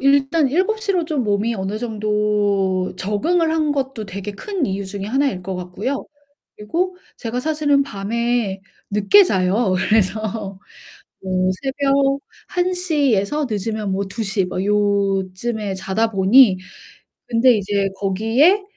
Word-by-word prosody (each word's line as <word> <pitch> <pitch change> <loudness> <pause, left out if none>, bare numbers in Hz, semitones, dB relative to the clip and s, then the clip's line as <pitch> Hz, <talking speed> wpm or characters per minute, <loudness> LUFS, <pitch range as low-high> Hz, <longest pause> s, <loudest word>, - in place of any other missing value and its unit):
일단 275 +2 +3
7:00 395 - 0
로 355 -3 +1
좀 300 -5 -1
몸이 210 +2 0
어느 195 +1 -3
정도 210 -4 0
적응을 320 - 0
한 310 -2 +1
것도 265 -6 -3
되게 200 +2 -6
큰 370 - -3
이유 195 +1 -3
중에 195 0 -6
하나일 265 -5 0
것 190 +1 -4
같고요. 190 +10 -4 0.5
그리고 350 - -2 0.2
제가 235 +1 -4
사실은 295 -1 +2
밤에 230 -3 -2 0.3
늦게 210 - +5
자요. 190 - +1
그래서 210 0 0 0.6
뭐 185 -1 0
새벽 275 0 +1 0.3
1:00 355 -7 +1
에서 275 +10 0
늦으면 210 -1 -2
뭐 200 +1 -1
2:00 195 -2 -1
막 185 +1 -3
요쯤에 200 +1 0
자다 195 +4 -1
보니 195 +1 +5 0.7
근데 245 +2 +5
이제 200 -1 0
거기에 225 - +3
215 Hz, 225 characters per minute, -20 LUFS, 195-275 Hz, 0.7 s, 늦게